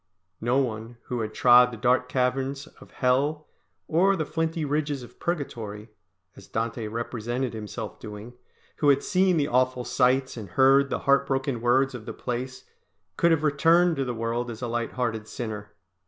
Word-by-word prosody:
No 120 +3 +1
one 115 -3 -2
who 125 -2 -4
had 110 -1 -3
trod 125 +2 +6
the 120 - -8
dark 125 +4 +2
caverns 135 +2 -1
of - - -17
Hell 140 +4 0 0.4
or 190 +5 +3
the 160 -4 -2
flinty 160 0 -2
ridges 145 -2 -1
of 120 - -15
Purgatory, 115 -10 -4 0.4
as - - -14
Dante 115 0 -3
represented 120 +2 -3
himself 110 0 -6
doing, 105 +2 -9 0.4
who 145 - +3
had 140 0 +4
seen 185 -1 +2
the 145 -2 +1
awful 125 -1 +1
sights 130 +1 +1
and 105 -4 -7
heard 135 +5 +4
the - - -2
heart 140 0 +4
broken 135 -3 -1
words 130 +3 +3
of 115 -3 -9
the - - -4
place, 130 +1 -5 0.5
could 170 - +3
have 160 -2 +2
returned 165 +4 +4
to 135 - 0
the 125 -2 -3
world 115 +2 -2
as 115 +1 -7
a - - -1
light 120 0 -2
hearted 115 -4 -2
sinner! 105 -3 -6
125 Hz, 175 wpm, -26 LUFS, 115-140 Hz, 0.5 s, trod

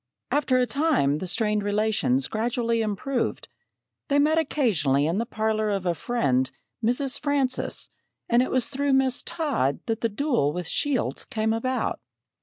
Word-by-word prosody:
After 275 -3 +2
a 250 - +3
time 270 - +1
the 185 - -4
strained 210 +2 +1
relations 220 +6 +1
gradually 230 +1 0
improved. 220 +5 -2 0.6
They 285 - +2
met 310 +3 +4
occasionally 175 - +1
in 170 +6 0
the 230 - -2
parlor 215 -1 0
of 195 -2 -1
a 175 - +2
friend, 135 - 0 0.3
Mrs. 255 +4 +1
Francis, 285 -3 0 0.4
and 235 +1 +4
it 255 - 0
was 255 -2 +1
through 280 +1 0
Miss 265 0 +2
Todd 290 - -1
that 225 -1 -2
the 230 - +1
duel 230 - 0
with 180 0 -4
Shields 285 - 0
came 220 0 -1
about. 255 +3 -1
235 Hz, 155 wpm, -25 LUFS, 205-270 Hz, 0.6 s, met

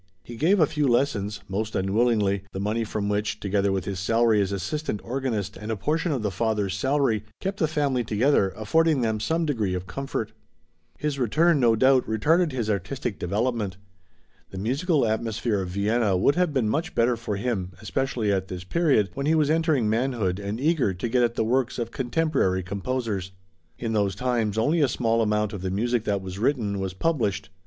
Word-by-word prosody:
He 120 - -9
gave 180 - +3
a 155 - +6
few 150 -1 0
lessons, 105 -5 0
most 105 +3 -3
unwillingly, 100 0 +2
the 95 - -4
money 105 +3 -1
from 105 -1 -3
which, 105 +1 -1
together 100 -1 0
with 95 -1 -1
his 100 -2 -3
salary 115 +2 +3
as 100 0 -1
assistant 105 +5 -3
organist 115 -6 -2
and 105 +1 -5
a - - 0
portion 160 - 0
of 130 -6 -1
the 105 - 0
father's 105 -1 -1
salary, 130 -1 +1 0.2
kept 195 +1 -3
the 160 - +3
family 145 -5 0
together, 110 -1 +2
affording 155 +6 +2
them 110 -2 0
some 165 +9 0
degree 110 -11 -1
of 90 0 -4
comfort. 135 -2 -4 0.7
His 145 -1 -2
return, 150 +7 +3
no 115 -3 +4
doubt, 130 +3 +4
retarded 155 +10 +2
his 120 -4 -2
artistic 100 +2 -3
development. 105 0 -1 0.7
The 95 - -9
musical 140 - +1
atmosphere 110 -1 -1
of 90 - -4
Vienna 100 +1 +1
would 120 +10 +3
have 180 0 +1
been 130 -6 +1
much 160 +10 -2
better 120 +1 +3
for 115 -2 -4
him, 100 -4 -2
especially 125 -3 -1
at 95 -1 -1
this 90 -1 -6
period, 130 - +2
when 140 +1 -3
he 160 - +4
was 155 -1 +2
entering 160 -7 +2
manhood 110 -5 0
and 100 +3 -4
eager 140 - +1
to 105 +6 -3
get 125 +2 +2
at 120 -1 +1
the - - +1
works 125 +1 0
of 115 -2 -3
contemporary 130 - 0
composers. 100 0 -3 0.4
In 115 -2 -3
those 100 -3 +1
times 115 -2 -1
only 150 +9 +2
a 145 - +4
small 115 -2 +1
amount 105 0 0
of 100 - -5
the 95 - -2
music 115 +4 0
that 100 -2 -1
was 95 +1 -6
written, 110 -5 0
was 95 -1 -3
published. 105 - -1
115 Hz, 195 wpm, -25 LUFS, 100-135 Hz, 0.7 s, a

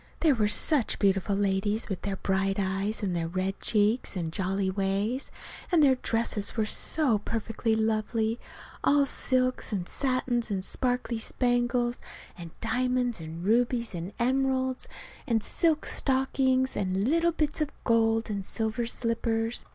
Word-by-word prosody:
They 315 -4 +5
were 215 -4 +1
such 250 +5 +4
beautiful 195 0 +1
ladies, 205 +2 0
with 195 -4 -4
their 200 -1 -3
bright 195 0 -1
eyes, 195 +3 -2
and 185 -3 -1
their 165 -1 -1
red 185 +3 -3
cheeks 215 +2 +1
and 165 -3 -3
jolly 190 +1 -1
ways; 200 +6 -1 0.4
and 335 -4 +4
their 270 -2 +6
dresses 230 -4 +1
were 220 - +2
so 250 0 +2
perfectly 225 +1 -2
lovely, 220 +1 0 0.4
all 285 0 +4
silks 255 -2 -1
and 185 -4 -3
satins 255 -3 0
and 190 -2 -2
sparkly 245 -1 0
spangles, 245 0 0 0.4
and 170 -3 -9
diamonds 245 0 0
and 165 +2 -7
rubies 235 +1 +1
and 175 +2 -5
emeralds, 260 +1 0 0.4
and 225 -4 +1
silk 320 -3 +1
stockings, 260 -1 +1
and 190 +2 -1
little 335 +4 +2
bits 310 -1 -1
of 300 - 0
gold 225 -1 +2
and 200 -2 -3
silver 220 +3 -2
slippers. 230 -1 -2
225 Hz, 145 wpm, -28 LUFS, 200-255 Hz, 0.4 s, their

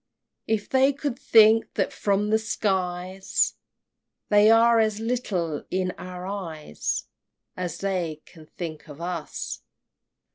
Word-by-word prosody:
If 220 -2 0
they 265 +1 +4
could 275 -2 -4
think 225 0 +5
that - - 0
from 205 +1 0
the 220 - +5
iskies 190 -3 -1 0.8
They 210 +1 +6
are 230 +1 +6
as 215 -1 +1
little 200 -10 -2
in 185 0 0
our 180 0 -8
eyes 165 - -4 0.5
As 180 -1 -4
they 175 -6 -2
can 160 -3 -16
think 155 -3 -7
of 145 +1 -10
us! 170 -2 -5
195 Hz, 120 wpm, -25 LUFS, 175-220 Hz, 0.8 s, They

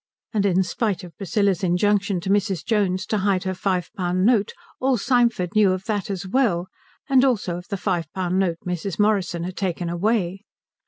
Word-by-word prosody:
And 200 -2 +2
in 190 0 +3
spite 205 +1 -2
of 175 -2 -11
Priscilla's 200 -1 0
injunction 195 +2 +2
to 190 - -4
Mrs. 195 -4 0
Jones 200 -4 +1
to 215 0 -1
hide 195 -1 +1
her 190 -1 -2
five 185 -2 -1
pound 185 -1 0
note 220 -4 +3 0.3
all 260 -1 +2
Symford 235 -5 +1
knew 210 -3 +4
of 185 +1 -5
that 205 -3 -2
as 195 -2 -3
well, 190 -6 +1 0.4
and 265 -2 +4
also 205 -10 +1
of 180 - -10
the 200 - -3
five 175 -5 -2
pound 185 0 -1
note 175 -4 +1
Mrs. 180 0 -3
Morrison 195 -5 +1
had 180 +1 -5
taken 175 -2 -2
away. 190 +1 0
190 Hz, 190 wpm, -23 LUFS, 180-210 Hz, 0.4 s, knew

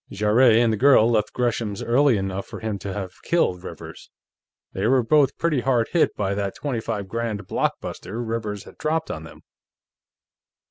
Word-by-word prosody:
Jarrett 110 +4 +4
and 115 -1 +3
the - - -1
girl 120 -2 +5
left 110 -2 +1
Gresham's 115 -4 -2
early 130 0 +3
enough 95 0 -3
for - - -8
him 110 -3 -3
to 100 - -5
have 95 -2 -6
killed 95 - 0
Rivers; - - -10 0.6
they 95 +3 -1
were 130 0 +3
both 145 +3 +3
pretty 165 -5 +1
hard 120 -2 +1
hit 170 - +2
by 100 -1 -1
that 100 -1 -3
twenty 130 -6 -3
five 105 -3 -4
grand 110 -1 -3
blockbuster 110 - -3
Rivers 110 -3 -3
had - - -16
dropped 160 +1 -1
on 80 0 -6
them.... 80 - -14
110 Hz, 175 wpm, -23 LUFS, 100-125 Hz, 0.6 s, girl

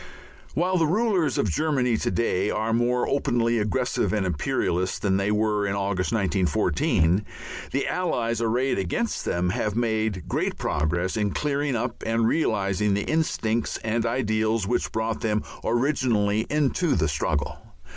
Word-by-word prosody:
While 180 +2 +1
the 160 - +3
rulers 180 - +1
of 105 - +1
Germany 130 - +1
to 120 - -1
day 105 -4 0
are 110 +1 -1
more 120 +1 +1
openly 120 -4 +1
aggressive 120 +4 0
and 105 -3 0
imperialist 90 +2 -1
than 95 -2 +2
they 100 +1 0
were 105 -1 +1
in 100 - -1
August, 95 -2 -1
1914, 95 -2 +1 0.5
the 140 - 0
Allies 120 -11 -1
arrayed 120 +2 +1
against 95 - -2
them 90 +1 0
have 105 +2 -1
made 110 -6 -1
great - - -1
progress 85 +5 -1
in 105 -1 +1
clearing 145 -2 0
up 120 +1 -3
and 115 0 +1
realizing 105 - +1
the 100 - -1
instincts 120 -8 0
and 115 +1 0
ideals 110 -3 0
which 120 +5 -1
brought 110 0 -2
them 105 -1 0 0.2
originally 115 -5 +1
into 150 +3 +1
the 80 -2 +1
struggle. 75 0 -1
110 Hz, 145 wpm, -25 LUFS, 100-125 Hz, 0.5 s, the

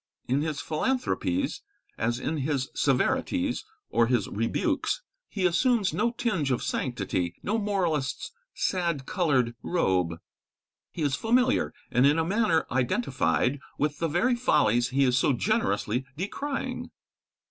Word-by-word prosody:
In 135 +3 +1
his 155 -2 -2
philanthropies, 265 - -1 0.3
as 120 +2 -1
in 155 +4 -2
his 140 -2 -1
severities 265 - +1 0.3
or 115 - +3
his 120 -5 +1
rebukes, 290 - -1 0.3
he 195 -3 -1
assumes 205 +3 +2
no 225 +4 +2
tinge 220 - -1
of 125 - 0
sanctity, 95 -8 -2
no 220 +3 0
moralist's 175 -10 -1 0.2
sad 170 -7 -1
coloured 135 -11 +1
robe. 90 - +1 0.7
He 165 - -4
is 145 -2 +1
familiar, 245 - +2 0.2
and 125 +3 +5
in 145 +2 +3
a 160 - +1
manner 185 -4 +2
identified, 125 - +1 0.2
with 150 0 -1
the 165 - +1
very 180 - +2
follies 120 - +3
he 135 +2 +2
is 125 -1 +3
so 145 - +3
generously 160 - 0
decrying. 275 - -3
155 Hz, 130 wpm, -27 LUFS, -, 0.7 s, and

